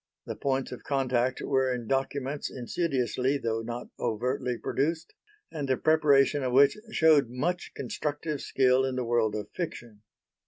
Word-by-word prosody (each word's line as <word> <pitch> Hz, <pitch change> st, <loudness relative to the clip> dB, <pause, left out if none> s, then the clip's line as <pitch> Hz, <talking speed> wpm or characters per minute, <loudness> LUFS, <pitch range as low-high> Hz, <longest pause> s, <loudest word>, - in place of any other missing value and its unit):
The -, -, -5 dB
points 135 Hz, -1 st, -1 dB
of 125 Hz, -, -8 dB
contact 130 Hz, -2 st, 0 dB
were 130 Hz, -1 st, +1 dB
in 125 Hz, -2 st, -3 dB
documents 135 Hz, +2 st, -2 dB
insidiously 130 Hz, -1 st, -1 dB
though 115 Hz, -4 st, -2 dB
not 120 Hz, +1 st, -6 dB
overtly 125 Hz, +2 st, -1 dB
produced 160 Hz, +7 st, -2 dB, 0.4 s
and 145 Hz, -4 st, -4 dB
the 130 Hz, -, +2 dB
preparation 145 Hz, -3 st, +4 dB
of 130 Hz, -2 st, -1 dB
which 140 Hz, +1 st, +6 dB, 0.2 s
showed 155 Hz, -, +4 dB
much 165 Hz, +9 st, -2 dB
constructive 150 Hz, 0 st, -3 dB
skill 130 Hz, 0 st, +3 dB
in 130 Hz, -1 st, -1 dB
the 125 Hz, -1 st, -2 dB
world 115 Hz, -2 st, +1 dB
of 105 Hz, -1 st, -5 dB
fiction. 120 Hz, -, -6 dB
130 Hz, 150 wpm, -28 LUFS, 125-145 Hz, 0.4 s, which